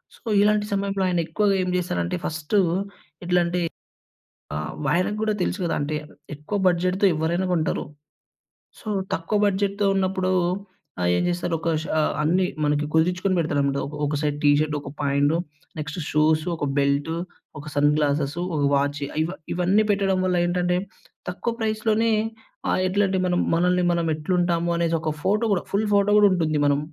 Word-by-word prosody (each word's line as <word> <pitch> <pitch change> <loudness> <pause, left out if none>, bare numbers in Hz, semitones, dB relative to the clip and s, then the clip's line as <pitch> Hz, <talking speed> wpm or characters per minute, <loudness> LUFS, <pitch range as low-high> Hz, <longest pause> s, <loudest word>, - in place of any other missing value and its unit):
So, - - -23 0.2
ఇలాంటి 210 0 +3
సమయంలో 195 -1 -1
ఆయన 175 -1 +1
ఎక్కువగా 200 +4 +1
ఏం 180 - -2
చేసారంటే 90 - -2
ఫస్టు 160 +6 0 0.7
ఎట్లాంటి 175 0 +1 1.0
ఆహ్, 75 0 -3 0.2
ఆయనకి 185 +4 +1
కూడా 215 -1 +1
తెలుసు 185 - -1
కదా! 165 - 0
అంటే 145 +2 -2 0.4
ఎక్కువ 150 +8 -4
బడ్జెట్‌తో 185 +2 +2
ఎవ్వరైనా 170 +4 0
కొంటారు. 160 -3 0 1.0
సో, - - -14 0.3
తక్కువ 165 +6 -1
బడ్జెట్‌తో 200 +1 0
ఉన్నప్పుడు. 185 -1 0 0.7
ఆహ్, 90 - +2
ఏం - - +1
చేస్తారు 175 -1 -1
ఒక 165 - -2
షా 160 - -1 0.2
అన్ని 180 +4 +2 0.2
మనకి 150 0 +1
కుదిర్చుకొని 180 +3 +2
పెడతారన్నమాట. 140 -3 0
ఒక 150 - -8
ఒక 145 +1 -1
సైడ్ 145 -1 -1
టీ 145 - +6
షర్టు, 155 -1 0
ఒక 140 - -8
పాయింటు, 145 +3 +2 0.4
నెక్స్ట్ 150 +3 -5
షూస్, 155 +1 +3
ఒక 150 - -3
బెల్టు, 140 +3 +1 0.4
ఒక 150 - -10
సన్‌ 145 0 +4
గ్లాసెస్, 145 +1 0 0.2
ఒక 150 - 0
వాఛీ 145 +1 0 0.2
ఇవ 165 - -3 0.2
ఇవన్నీ 190 +5 +2
పెట్టడం 195 -1 +1
వల్ల 185 -1 +1
ఏంటంటే, 180 0 +1 0.5
తక్కువ 230 +6 -3
ప్రైస్‌లోనే 220 +1 +1 0.6
ఆహ్, 185 - +1
ఎట్లాంటి 195 0 +1
మనం 180 -1 +1
మనల్ని 180 +1 +2
మనం 170 -1 0
ఎట్లు 155 +4 -3
ఉంటాము 170 -1 +1
అనేసి 170 -1 +1
ఒక 155 - -1
ఫోటో 210 +4 +2
కూడా, 180 - -1
ఫుల్ 210 +1 +1
ఫోటో 200 +1 +3
కూడా 205 -1 +6
ఉంటుంది. 160 -4 0
మనం 145 0 +2
175 Hz, 160 wpm, -24 LUFS, 150-190 Hz, 1.0 s, టీ